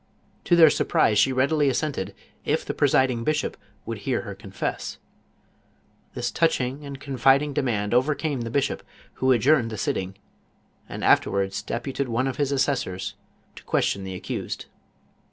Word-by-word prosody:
To 175 Hz, -, +4 dB
their 160 Hz, -3 st, +8 dB
sur -, -, 0 dB
prise 105 Hz, -, +3 dB
she 135 Hz, -, +4 dB
readily 140 Hz, +3 st, +2 dB
assented, 125 Hz, -8 st, -2 dB, 0.3 s
if -, -, 0 dB
the -, -, -3 dB
presiding 130 Hz, -3 st, +2 dB
bishop 155 Hz, +3 st, 0 dB, 0.3 s
would 115 Hz, -2 st, -5 dB
hear 120 Hz, +4 st, -1 dB
her 100 Hz, -4 st, -7 dB
confess. 95 Hz, 0 st, -5 dB, 1.2 s
This 120 Hz, -, -2 dB
touching 145 Hz, -4 st, 0 dB
and 140 Hz, -1 st, -7 dB
confiding 135 Hz, +2 st, +2 dB
dem; 135 Hz, -1 st, 0 dB
md 105 Hz, -3 st, -1 dB
overcame 140 Hz, +2 st, +1 dB
the 115 Hz, -, -4 dB
bishop, 140 Hz, +4 st, 0 dB, 0.4 s
who 130 Hz, 0 st, +4 dB
adjourned 125 Hz, 0 st, +4 dB
the 110 Hz, -, -6 dB
sitting, 95 Hz, -1 st, -2 dB, 0.7 s
and -, -, -6 dB
af -, -, +6 dB
terwards 95 Hz, 0 st, -2 dB
deputed 130 Hz, +2 st, -3 dB
one 120 Hz, +3 st, 0 dB
of 130 Hz, -1 st, -3 dB
his 145 Hz, -2 st, 0 dB
assessors 125 Hz, -9 st, -1 dB, 0.4 s
to -, -, -12 dB
question 100 Hz, -, 0 dB
the 95 Hz, -1 st, -5 dB
accused. -, -, -5 dB
130 Hz, 155 wpm, -25 LUFS, 110-140 Hz, 1.2 s, their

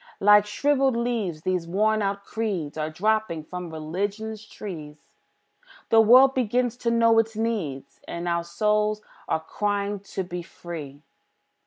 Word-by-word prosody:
Like 210 Hz, +1 st, +6 dB
shrivelled 270 Hz, +2 st, +2 dB
leaves, 220 Hz, -10 st, -2 dB
these 180 Hz, -2 st, -1 dB
worn 215 Hz, +4 st, +2 dB
out 200 Hz, 0 st, -2 dB
creeds 200 Hz, -10 st, -3 dB
Are 155 Hz, 0 st, -2 dB
dropping 210 Hz, -1 st, 0 dB
from 180 Hz, +2 st, -7 dB
Religion's 200 Hz, +8 st, -4 dB
tree; 160 Hz, -9 st, -8 dB, 0.9 s
The 225 Hz, -, +7 dB
world 255 Hz, +4 st, +7 dB
begins 245 Hz, -1 st, 0 dB
to 240 Hz, -, -1 dB
know 230 Hz, -1 st, +4 dB
its 225 Hz, 0 st, 0 dB
needs, 190 Hz, -13 st, -3 dB
And 170 Hz, +1 st, -5 dB, 0.2 s
souls 210 Hz, +4 st, 0 dB, 0.2 s
are 160 Hz, -, 0 dB
crying 205 Hz, +3 st, -2 dB
to 195 Hz, -1 st, -5 dB
be 175 Hz, 0 st, -5 dB
free. 155 Hz, -4 st, -9 dB
205 Hz, 135 wpm, -25 LUFS, 170-225 Hz, 0.9 s, The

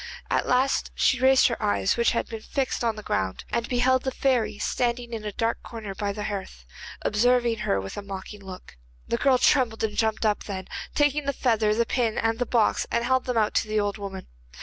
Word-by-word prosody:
At -, -, +1 dB
last 260 Hz, +2 st, +2 dB
she 265 Hz, -, +2 dB
raised 265 Hz, 0 st, +5 dB
her 235 Hz, -, -3 dB
eyes, 205 Hz, -2 st, +1 dB
which 235 Hz, 0 st, +3 dB
had 235 Hz, -, -1 dB
been 225 Hz, -1 st, -7 dB
fixed 265 Hz, +1 st, -2 dB
on 230 Hz, -2 st, +1 dB
the 215 Hz, -, -8 dB
ground, 95 Hz, -, -2 dB
and 235 Hz, 0 st, -1 dB
beheld 255 Hz, +1 st, +3 dB
the 265 Hz, -, -1 dB
fairy 240 Hz, -6 st, 0 dB
standing 240 Hz, +1 st, -1 dB
in 220 Hz, -2 st, -4 dB
a 210 Hz, -, -3 dB
dark 230 Hz, +3 st, -1 dB
corner 220 Hz, -4 st, -7 dB
by 200 Hz, +1 st, -2 dB
the 210 Hz, +1 st, -5 dB
hearth, 190 Hz, -, -6 dB, 0.4 s
observing 235 Hz, +1 st, +2 dB
her 95 Hz, -, 0 dB
with 95 Hz, 0 st, -7 dB
a -, -, -3 dB
mocking 200 Hz, +1 st, -8 dB
look. 185 Hz, -, -10 dB, 0.3 s
The 235 Hz, -, 0 dB
girl 265 Hz, 0 st, +4 dB
trembled 245 Hz, -4 st, +2 dB
and 215 Hz, -1 st, -1 dB
jumped 220 Hz, 0 st, 0 dB
up, 210 Hz, -1 st, +1 dB
then, 190 Hz, -2 st, -5 dB, 0.3 s
taking 290 Hz, 0 st, +2 dB
the 280 Hz, -, 0 dB
feather, 220 Hz, -5 st, +2 dB
the 235 Hz, +1 st, +2 dB
pin, 230 Hz, -2 st, 0 dB
and 225 Hz, +1 st, 0 dB
the 245 Hz, -, 0 dB
box, 230 Hz, -3 st, +2 dB
she 235 Hz, -, +1 dB
held 260 Hz, +1 st, +1 dB
them 250 Hz, -2 st, -1 dB
out 215 Hz, -2 st, +2 dB
to -, -, +1 dB
the 215 Hz, 0 st, 0 dB
old 205 Hz, 0 st, -1 dB
woman. 195 Hz, -2 st, -6 dB
225 Hz, 220 wpm, -25 LUFS, 210-250 Hz, 0.4 s, raised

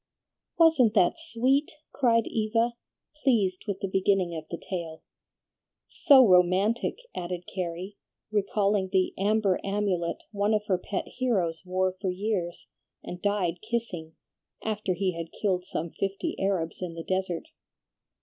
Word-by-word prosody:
"Wasn't 300 Hz, -10 st, +5 dB
that 190 Hz, -, +3 dB
sweet?" 275 Hz, -2 st, +1 dB, 0.2 s
cried 230 Hz, -4 st, +3 dB
Eva, 225 Hz, +2 st, 0 dB, 0.5 s
pleased 205 Hz, -9 st, +2 dB
with 200 Hz, -2 st, -3 dB
the 195 Hz, -, -1 dB
beginning 190 Hz, -2 st, +1 dB
of 160 Hz, -1 st, -6 dB
the 170 Hz, -, -4 dB
tale. 170 Hz, -4 st, -6 dB, 0.9 s
"So 265 Hz, -4 st, +6 dB
romantic!" 185 Hz, +5 st, +3 dB, 0.2 s
added 175 Hz, 0 st, -4 dB
Carrie, 185 Hz, +2 st, -5 dB, 0.3 s
recalling 200 Hz, -1 st, +1 dB
the 190 Hz, -2 st, +2 dB
"amber 200 Hz, -1 st, +2 dB
amulet" 195 Hz, -4 st, -1 dB
one 205 Hz, +1 st, +1 dB
of 210 Hz, 0 st, -1 dB
her 190 Hz, -4 st, +1 dB
pet 190 Hz, +1 st, -3 dB
heroes 190 Hz, -11 st, -1 dB
wore 185 Hz, +1 st, +1 dB
for 190 Hz, -, 0 dB
years, 180 Hz, -2 st, -2 dB, 0.4 s
and 180 Hz, 0 st, -7 dB
died 185 Hz, -4 st, 0 dB
kissing, 215 Hz, -8 st, -4 dB, 0.5 s
after 210 Hz, -4 st, -1 dB
he 190 Hz, +1 st, 0 dB
had 165 Hz, -1 st, -6 dB
killed 185 Hz, -3 st, 0 dB
some 165 Hz, -3 st, -4 dB
fifty 195 Hz, 0 st, -3 dB
Arabs 185 Hz, -4 st, -1 dB
in 175 Hz, -2 st, -4 dB
the 165 Hz, -, -6 dB
desert. 185 Hz, -2 st, -2 dB
195 Hz, 135 wpm, -27 LUFS, 180-215 Hz, 0.9 s, So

